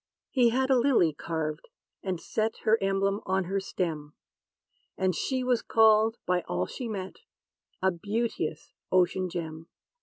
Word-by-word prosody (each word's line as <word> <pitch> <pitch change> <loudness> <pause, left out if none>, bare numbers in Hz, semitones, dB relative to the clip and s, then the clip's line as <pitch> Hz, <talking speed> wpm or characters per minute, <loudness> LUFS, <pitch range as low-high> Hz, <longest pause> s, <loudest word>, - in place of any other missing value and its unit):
He 245 -3 +4
had 260 +3 +1
a 260 - +5
lily 235 - +3
carved, 155 - -4 0.3
and 185 -3 -3
set, 220 +5 -2
Her 220 +1 +4
emblem, 195 +1 +1
on 190 0 +1
her 195 +3 -1
stem; 160 -6 -4 0.8
And 185 -1 +1
she 255 - -1
was 250 -2 +2
called, 220 0 +4
by 180 0 +1
all 90 +1 -1
she 245 - -6
met, 190 -3 -5 0.7
A 190 - +4
beauteous 200 -4 -3 0.2
ocean 185 0 +2
gem. 165 -2 -6
190 Hz, 145 wpm, -28 LUFS, 170-225 Hz, 0.8 s, a